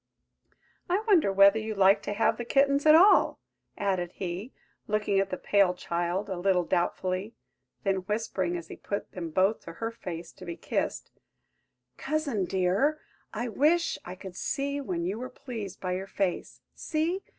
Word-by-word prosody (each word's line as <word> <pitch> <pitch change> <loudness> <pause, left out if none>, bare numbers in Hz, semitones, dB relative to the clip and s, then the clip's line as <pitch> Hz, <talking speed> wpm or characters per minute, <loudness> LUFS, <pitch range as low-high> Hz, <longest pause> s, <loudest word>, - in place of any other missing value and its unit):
I 380 +5 +1
wonder 345 - +4
whether 200 +2 +6
you 220 0 -4
like 195 +1 +5
to 205 - -3
have 220 +2 +2
the 240 - -3
kittens 280 +4 +2
at 305 - +9
all?" 380 +5 +6 0.4
added 185 -3 -1
he, 190 +6 -5 0.4
looking 210 -2 +1
at 195 0 0
the 185 - -3
pale 195 -3 +3
child 175 +3 -2
a 190 -3 -4
little 180 -1 +2
doubtfully; 185 +4 -1 0.5
then 195 -1 +1
whispering, 190 -2 -2
as 170 -1 -9
he - - -7
put 200 - -5
them 170 -3 -5
both 190 +6 +2
to 165 - -8
her 225 +6 -4
face 170 -7 -7
to - - -14
be 170 -2 -6
kissed, - - -3 0.9
"Cousin, 280 - -1
dear, 195 - +1 0.3
I 235 +3 -3
wish 310 +8 +2
I 180 - -7
could 185 -1 -10
see 280 +7 -2
when 175 -9 -3
you 195 +5 -2
were 255 +1 -5
pleased 225 -8 -7
by 185 - -3
your 190 +2 -3
face! 195 -3 -3
See! 330 +4 -1
200 Hz, 170 wpm, -28 LUFS, 185-250 Hz, 0.9 s, at